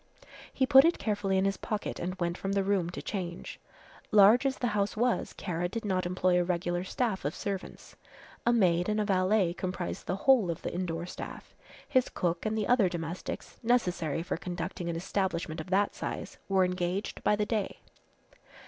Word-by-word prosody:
He 265 - +1
put 265 +1 +8
it 335 +2 +3
carefully 205 -3 0
in 190 - +2
his 195 -1 0
pocket 215 -1 -4
and 185 +2 -3
went 170 -1 0
from 195 +1 -3
the 200 -1 +2
room 190 -3 +1
to 180 - -7
change. 180 -4 -5 0.5
Large 215 +6 +6
as 265 - -2
the - - -2
house 205 0 0
was 245 +1 +1
Kara 175 -1 -3
did 225 +3 -5
not 185 -3 0
employ 180 0 +2
a - - +2
regular 175 0 -1
staff 215 0 -1
of 145 +5 -2
servants. 195 -2 -6 0.5
A 240 - +3
maid 180 -5 +3
and 215 0 +1
a 210 - +1
valet 190 -2 +2
comprised 180 0 -4
the 180 - 0
whole 230 -2 +4
of 170 +1 -4
the - - -3
indoor 170 -1 -2
staff. 180 - -8 0.3
His 255 -3 +2
cook, 175 +3 -1
and 220 0 -1
the 215 - 0
other 230 -6 +4
domestics, 170 0 -6
necessary 180 - +1
for 175 - -3
conducting 175 0 -4
an 170 - -2
establishment 170 -3 -2
of 155 - -10
that 200 +2 +2
size, - - -5
were 190 -1 +4
engaged 180 +2 -2
by 210 - +4
the 210 0 0
day. 210 -3 -2
190 Hz, 190 wpm, -30 LUFS, 175-210 Hz, 0.5 s, put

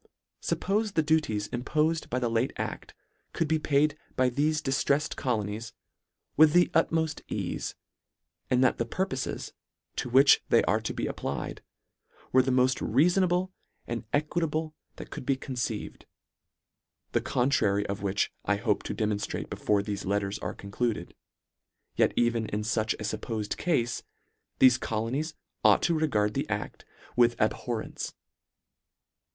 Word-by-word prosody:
Suppofe 210 +1 0
the 160 - +3
duties, 150 -10 +1
impofed 155 +6 0
by 125 - -1
the 125 -2 0
late 115 +3 0
acl, - - -4 0.4
could 165 - 0
be 160 +1 +2
paid 145 0 +2 0.2
by 130 -1 +3
thefe 155 +4 +1
diftreffed 140 +2 +1
colonies, 110 -2 -2 0.6
with 155 0 +6
the 175 0 +5
utmoft 160 -1 +1
eafe, - - -3 0.7
and 125 0 +3
that 130 - +3
the 115 - +1
purpofes, 130 -3 -3 0.5
to 125 - -2
which 135 +3 +6
they - - +5
are - - +1
to - - -3
be - - -2
applied, - - -4 0.7
were 130 - +6
the 130 - -1
moft 130 0 +3
reafonable 180 - +2 0.3
and 120 0 -4
e 145 - +3
quitable 155 0 -2 0.2
that - - -10
could - - -6
be 135 +1 +1
conceived, 130 -2 -4 1.0
the - - +1
contra 125 -4 +2
ry 100 - +1
of 100 0 -4
which 100 -1 0
I 100 - +2
hope 105 0 0
to - - -3
demonftrate 105 -1 -2
before 100 -1 +1
thefe 100 -1 -4
letters 100 +1 -1
are - - -4
concluded, 100 -2 -3 0.8
yet - - +3
even 120 -2 +1
in 105 +1 -2
such 110 0 0
a - - -8
fuppofed 105 0 -3
cafe, 120 -9 0 0.6
thefe 130 -1 +7
colonies 130 +10 -2 0.3
ought - - +5
to 170 - +3
re 155 -1 +2
gard 105 -5 +1
the - - -2
acl - - -3 0.3
with 120 -1 +4
abhorrence. 110 +1 -2
125 Hz, 145 wpm, -28 LUFS, 110-155 Hz, 1.0 s, thefe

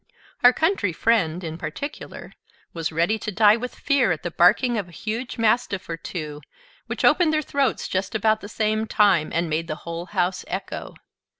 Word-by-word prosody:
Our 245 - +8
Country 285 - 0
Friend, 180 -4 +1
in 160 0 -6
particular, 280 - -7 0.4
was 165 -2 -3
ready 170 +8 +1
to 215 - -4
die 210 +1 +5
with 250 +2 -6
fear 280 -4 +2
at 160 - -3
the 175 - -3
barking 220 +9 +4
of 205 -5 -2
a - - -16
huge 230 +7 -4
mastiff 225 -3 +1
or 165 - -3
two, 155 -3 -6 0.5
which - - -2
opened 345 -4 +4
their 310 0 +1
throats 280 -1 0
just 190 +2 -2
about 220 0 +2
the 205 - -8
same 215 0 -1
time, 195 -8 +3
and 170 +1 0
made 160 +1 -2
the 155 - -3
whole 170 +1 -5
house 180 0 -1
echo. - - -5
205 Hz, 185 wpm, -23 LUFS, 170-230 Hz, 0.5 s, Our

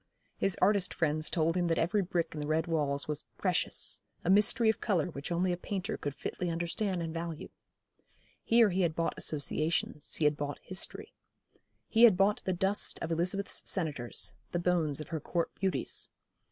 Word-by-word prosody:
His 195 - 0
artist 200 -1 +3
friends 155 -1 0
told 165 0 +1
him 175 -1 +1
that 165 - +1
every 200 +5 +2
brick 175 -2 -1
in 155 - -5
the 150 - -3
red 155 +1 +1
walls 145 -4 -1
was 150 -1 -3
'precious,' - - 0 0.2
a 180 - +3
mystery 210 +3 +4
of 220 - +2
colour 180 -5 0
which 140 +2 -6
only 180 +2 +1
a 175 - -1
painter 190 +1 -3
could 145 -1 -5
fitly 180 - -4
understand 175 +2 -1
and 160 -1 -4
value. 165 -1 -5 0.9
Here 230 -3 +5
he 190 +2 +1
had 165 -3 +1
bought 165 - 0
associations, 155 0 0
he 155 - 0
had 150 0 +3
bought 145 -1 -3
history. 300 - -5 0.7
He 230 +1 +6
had 210 -6 +6
bought 200 +2 +3
the 185 - +1
dust 190 +3 +3
of 165 - -4
Elizabeth's 180 +4 0
senators, 150 -10 -1 0.2
the - - +1
bones 170 -4 0
of 155 - -9
her 165 -2 -2
court 170 +3 -2
beauties. 190 -1 -1
170 Hz, 180 wpm, -31 LUFS, 155-190 Hz, 0.9 s, He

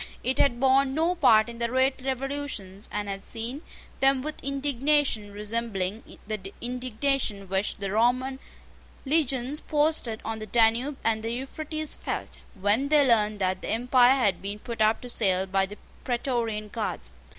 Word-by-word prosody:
It 260 - +1
had 240 -4 +3
borne 265 +1 +3
no 330 +3 +2
part 220 -11 +5
in 235 0 -9
the 235 - +1
late 260 +2 +1
revolutions, 265 -7 -4
and 210 0 -3
had 195 0 -5
seen 235 +5 -4 0.4
them 270 -1 +3
with 305 +1 -6
indignation 275 -5 0
resembling 210 -1 -3
the 205 -3 -5
indignation 250 -3 -2
which 190 +2 -1
the 195 -1 -3
Roman 255 +5 +1 0.7
legions 275 -2 +1
posted 295 -8 +1
on 225 0 -3
the 215 - -7
Danube 235 +5 +3
and 220 -1 +1
the 225 +1 -3
Euphrates 310 +5 -4
felt, - - -5 0.2
when 210 +8 +2
they 290 -2 +5
learned 215 -3 +3
that 185 0 0
the - - -5
empire 250 +2 +4
had 205 -9 +1
been 200 +1 -4
put 230 +1 -6
up 215 +1 +3
to 250 - -8
sale 190 -5 +2
by 195 0 +1
the 205 +2 -10 0.3
Praetorian 235 -4 -2
Guards. 200 - -4
235 Hz, 160 wpm, -27 LUFS, 210-270 Hz, 0.7 s, part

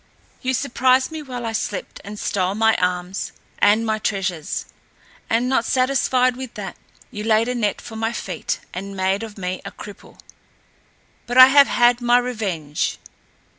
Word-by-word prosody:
"You 260 0 0
surprised 260 +1 +2
me 315 -1 -5
while 250 -4 -6
I 225 - -2
slept 215 -3 -4
and 205 +1 -8
stole 190 -1 -1
my 225 +1 +3
arms 180 +1 -2 0.3
and 215 +3 +4
my 220 -1 0
treasures; 185 -7 -2 0.6
and 235 +2 +2
not 260 -3 +2
satisfied 255 0 +2
with 260 -1 -8
that 195 -4 -6 0.4
you 210 - -6
laid 220 +1 +3
a 250 - -1
net 210 -5 -1
for 225 - -10
my 225 +1 -1
feet - - -4
and 195 +1 -6
made 190 +2 +1
of 220 -2 -8
me 185 -1 -4
a - - -6
cripple. 205 -1 -12 1.1
But 245 +1 -2
I 255 0 +11
have 280 0 +7
had 240 0 +3
my 240 0 +4
revenge. 200 -12 -2
225 Hz, 165 wpm, -21 LUFS, 200-250 Hz, 1.1 s, I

